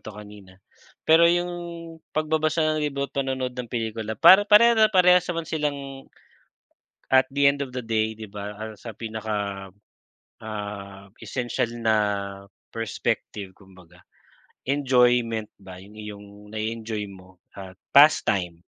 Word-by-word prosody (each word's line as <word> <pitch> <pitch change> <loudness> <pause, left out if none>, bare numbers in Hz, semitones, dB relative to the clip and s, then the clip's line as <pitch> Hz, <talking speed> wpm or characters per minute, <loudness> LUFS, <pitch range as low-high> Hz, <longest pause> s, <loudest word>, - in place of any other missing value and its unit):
'to 110 - -10
kanina, 105 -2 -12 0.5
pero 165 +1 +6
yung 175 +1 +1 0.6
pagbabasa 155 +1 0
ng 155 0 +1
libro 140 -1 -2
at - - -42
panonood 130 -2 -2
ng 125 -1 -4
pelikula 110 -2 -4
para 195 - +7
pareha 230 +3 +6
na 215 0 +5
parehas 180 -1 +5
naman 165 -2 -3
silang, 140 -3 -4 1.0
at 130 0 +5
the 140 0 +2
end 140 0 -5
of 135 - -5
the 125 - -3
day, 110 -1 -1
di 110 - -7
ba? 105 +2 -7
Sa 115 +3 -9
pinaka, 105 -3 -5 0.7
ah, 100 -2 -7
essential 120 -2 -2
na 110 -1 +2 0.8
perspective 105 -3 -3
kumbaga. 95 -3 -19 0.7
Enjoyment 125 -5 +2
ba 95 -2 -11
yung 100 +3 -15
iyong 105 -1 -9 0.2
nai-enjoy 110 -1 -4
mo 95 -1 -16 0.2
at 95 -1 -10 0.2
past 150 +2 +7
time. 90 -3 -1
115 Hz, 130 wpm, -24 LUFS, 105-140 Hz, 1.0 s, para